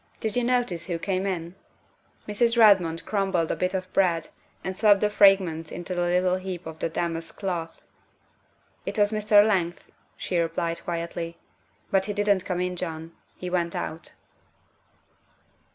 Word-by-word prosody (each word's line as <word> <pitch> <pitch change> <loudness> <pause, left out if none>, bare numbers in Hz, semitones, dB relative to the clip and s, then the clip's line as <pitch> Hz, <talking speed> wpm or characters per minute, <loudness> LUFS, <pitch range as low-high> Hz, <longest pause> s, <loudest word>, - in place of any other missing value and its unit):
Did 220 -2 -2
you 245 - +2
notice 240 -9 0
who 175 -2 -2
came 190 +2 -1
in?" 170 -2 -3 0.7
Mrs. 230 +3 +1
Redmond 185 -7 +5
crumbled 195 -5 0
a - - 0
bit 185 +1 -1
of 185 -1 -4
bread 170 -4 +2 0.3
and 190 - -3
swept 205 0 +5
the 210 0 +2
fragments 190 -6 +4
into 175 +1 -5
a 175 - -1
little 180 +1 +2
heap 185 -1 -6
on 160 0 -7
the - - -1
damask 165 0 -3
cloth. 170 -4 -4 0.5
" - - -39
It - - -3
was 205 0 +3
Mr. 210 -1 +5
Leigh," 175 -5 +1 0.4
she 180 - -1
replied 165 0 -2
quietly, 170 0 -4 0.3
" - - -38
but 190 -1 +3
he 205 - -3
didn't 205 -2 +1
come 180 -1 -2
in, 180 0 -2
John, 165 -2 -5 0.2
he 180 - -7
went 170 -2 -1
out." 160 - -5
185 Hz, 165 wpm, -26 LUFS, 170-200 Hz, 0.7 s, Redmond